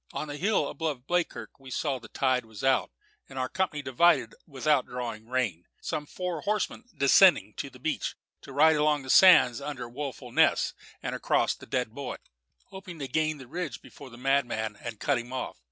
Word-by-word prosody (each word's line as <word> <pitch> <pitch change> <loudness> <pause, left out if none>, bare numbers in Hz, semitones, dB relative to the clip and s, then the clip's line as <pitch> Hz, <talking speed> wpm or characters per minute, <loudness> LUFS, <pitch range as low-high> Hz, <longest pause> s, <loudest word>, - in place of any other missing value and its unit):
On 155 - -4
the 145 - -5
hill 200 +6 +1
above 150 -6 -4
Bleakirk 175 -3 -2
we 135 -1 -12
saw 135 0 -1
that - - -29
the - - -11
tide 130 -2 +2
was 110 0 -11
out, 135 -1 +2 0.4
and 135 - -10
our 130 0 0
company 155 -5 -2
divided 145 +6 +3
without 140 -1 +1
drawing 115 -3 -6
rein, 115 -10 -1
some 150 -1 -4
four 180 -2 -4
horsemen 210 +4 -2
descending 140 - +5
to 140 - -4
the 130 - -15
beach, 150 +5 -2 0.3
to - - -11
ride 155 +3 +5
along 150 -1 +2
the 130 - -2
sands 140 -10 +7
out 140 - -6
under 130 -5 -5
Woeful 135 +1 -6
Ness, - - +3 0.3
and - - -3
across - - +1
the - - -14
Dead 125 -3 -1
Boy, 135 +2 -5 0.5
hoping 190 -3 -9
to 140 -3 -5
gain 155 +3 0
the 130 - -11
ridge 155 0 -5
before 140 - -13
the 120 - -13
madman 120 -5 0
and 115 -3 -6
cut 140 -4 +1
him 120 +1 -9
off. 130 -1 -5
135 Hz, 200 wpm, -28 LUFS, 125-155 Hz, 0.5 s, sands